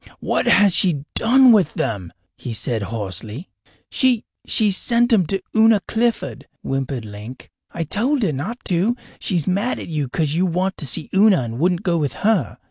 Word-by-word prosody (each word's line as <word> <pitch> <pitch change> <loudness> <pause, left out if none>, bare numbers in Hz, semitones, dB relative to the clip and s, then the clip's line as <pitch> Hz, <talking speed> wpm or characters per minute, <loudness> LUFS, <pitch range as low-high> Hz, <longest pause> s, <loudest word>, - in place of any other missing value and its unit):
"What - - -1
has 200 -2 +5
she 155 -7 +2
done 255 +2 +5
with 200 -9 +3
them?" 95 -6 -3 0.2
he 120 - -6
said 115 0 -2
hoarsely. 105 - -5 0.4
"She 255 -4 +1 0.2
she 215 -2 +2
sent 235 +5 +2
'em 185 -7 +3
to 195 +2 -2
Una 220 -1 +5
Clifford," 225 - -2 0.2
whimpered 135 -3 -3
Link. 105 +4 -10 0.2
"I 170 - -3
told 245 - 0
her 170 -7 0
not 195 - -5
to. 190 +7 +1 0.2
She's 175 -6 -1
mad 200 +7 0
at - - -8
you, 150 -5 -2
cause 150 +1 -1
you 180 +3 +1
went 185 +2 -1
to 145 - -4
see 150 +4 -2
Una 195 - +4
and 115 +1 -6
wouldn't 175 +2 +1
go 175 -2 +1
with 145 -3 -1
her. 205 - +1
175 Hz, 180 wpm, -20 LUFS, 135-215 Hz, 0.4 s, has